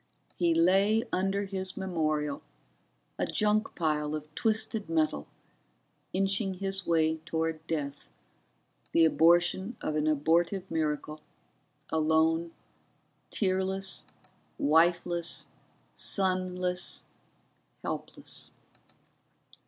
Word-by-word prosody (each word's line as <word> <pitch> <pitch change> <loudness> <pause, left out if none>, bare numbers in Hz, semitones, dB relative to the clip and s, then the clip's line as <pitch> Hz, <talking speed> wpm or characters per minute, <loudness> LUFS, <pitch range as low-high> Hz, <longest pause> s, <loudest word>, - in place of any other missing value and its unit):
He 170 -2 +2
lay 195 +6 +4
under 195 +2 0
his 190 -1 -4
memorial, 155 -6 -1 0.8
a - - +1
junk 210 0 +1
pile 150 -2 0
of 155 0 -8
twisted 220 -1 -1
metal, 155 - 0 0.8
inching 195 +1 0
his 195 0 -3
way 160 -1 +3
toward 160 0 -3
death, 145 -3 -3 0.8
the 165 - +6
abortion 175 +7 +3
of 155 - -2
an 155 0 +1
abortive 170 +5 +1
miracle, 155 -1 -2 0.7
alone, 160 +1 +2 0.8
tearless, 190 -1 0 0.5
wifeless, 170 +2 +2 0.4
sonless, 185 -1 0 0.8
helpless. - - -6
170 Hz, 80 wpm, -30 LUFS, 160-190 Hz, 0.8 s, the